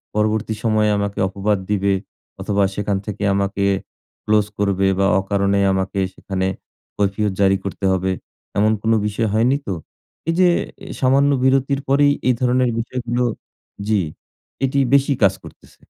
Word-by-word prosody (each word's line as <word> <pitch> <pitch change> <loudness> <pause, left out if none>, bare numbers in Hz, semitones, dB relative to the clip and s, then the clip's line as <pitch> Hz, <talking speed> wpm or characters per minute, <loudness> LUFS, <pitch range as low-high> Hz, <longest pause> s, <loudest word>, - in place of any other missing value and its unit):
পরবর্তী 110 +1 0
সময়ে 110 -2 +2
আমাকে 100 0 -2
অপবাদ 100 +2 0
দিবে 100 -1 +1 0.5
অথবা 100 -1 +1
সেখান 105 -1 -1
থেকে 105 -1 -5
আমাকে 100 0 -1 0.6
ক্লোজ 105 -1 +3
করবে 100 -1 +2
বা 100 - +3
অকারণে 100 0 +1
আমাকে 95 +1 -1
সেখানে 95 -1 -3 0.5
কৈফিয়ত 100 +1 0
জারি 95 0 +4
করতে 100 0 -4
হবে। 95 0 0 0.5
এমন 105 +2 +4
কোন 115 - +1 0.2
বিষয় 110 +2 -1
হয়নি 120 +5 +3
তো? 100 - -1 0.6
এই - - +3
যে 180 -1 +6 0.3
অ্যা 195 - -8
সামান্য 140 +2 +4
বিরতির 135 +1 +2
পরেই 145 +1 +4
এই 125 - +5
ধরনের 125 0 +2
বিষয়গুলো 120 +1 -2 0.6
জ্বী, 105 -2 +2 0.6
এটি 135 +1 0
বেশি 140 0 +4
কাজ 95 -1 +5
করতেছে। - - -16
105 Hz, 145 wpm, -20 LUFS, 100-125 Hz, 0.6 s, যে